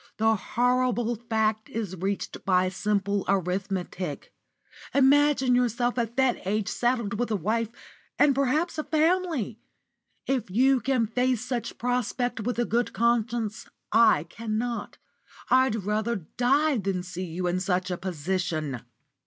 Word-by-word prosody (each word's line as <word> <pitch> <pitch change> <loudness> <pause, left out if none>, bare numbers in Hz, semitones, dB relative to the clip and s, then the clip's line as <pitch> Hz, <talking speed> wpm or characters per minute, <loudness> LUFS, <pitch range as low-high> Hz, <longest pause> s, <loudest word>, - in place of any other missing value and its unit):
The 220 +1 +3
horrible 245 +2 +1
fact 220 -1 -1
is 210 -5 -4
reached 195 +3 -3
by 185 -1 +3
simple 200 0 0
arithmetic. 185 -3 -2 0.6
Imagine 280 -1 +4
yourself 245 0 +1
at 235 +1 -3
that 265 -2 +2
age 210 0 0
saddled 235 -4 0
with 245 - 0
a 215 - +1
wife, 215 +4 0 0.5
and 290 -1 +5
perhaps 285 +5 0
a - - -1
family! 315 - 0 0.7
If 255 -6 -1
you 260 +7 +4
can 255 -1 +1
face 250 +1 0
such 245 -2 -2
a - - -13
prospect 245 0 -1
with 235 +3 -2
a 240 - +1
good 240 +2 0
conscience, 235 -2 0 0.2
I 225 -9 +5
cannot. 225 +6 -4 0.5
I'd 260 -2 +4
rather 215 +3 0
die 255 - +1
than 190 -2 -2
see 185 0 -5
you 175 +2 -4
in 180 +1 0
such 185 0 -1
a - - 0
position." 170 -6 -2
225 Hz, 135 wpm, -26 LUFS, 195-250 Hz, 0.7 s, and